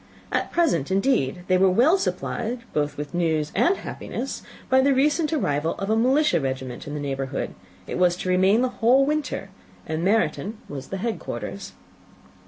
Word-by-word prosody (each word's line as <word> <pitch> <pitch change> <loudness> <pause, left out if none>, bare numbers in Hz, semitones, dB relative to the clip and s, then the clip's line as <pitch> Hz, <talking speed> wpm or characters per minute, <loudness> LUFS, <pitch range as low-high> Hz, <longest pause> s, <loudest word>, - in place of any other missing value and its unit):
At - - -1
present, 280 - +1
indeed, 190 - +1
they 185 -1 +3
were 190 0 +5
well 250 - +4
supplied 235 -9 -2
both 150 -1 -1
with 145 -1 -6
news 160 -3 0
and 370 +3 +3
happiness - - -5 0.3
by 260 0 +4
the 275 0 +3
recent 300 +4 +2
arrival 160 - 0
of 195 +2 -3
a - - +4
militia 255 - +3
regiment 130 -2 -4
in 145 - -5
the - - -3
neighbourhood; 135 -1 -3 0.3
it - - -4
was 180 -1 +4
to 185 - -4
remain 190 +6 +4
the 255 - +1
whole 255 +4 +5
winter, 300 0 -2 0.3
and 160 +1 -3
Meryton 210 +1 +1
was 135 -2 -7
the 195 - -4
head 225 +3 -2
quarters. - - -6
190 Hz, 175 wpm, -24 LUFS, -, 0.3 s, were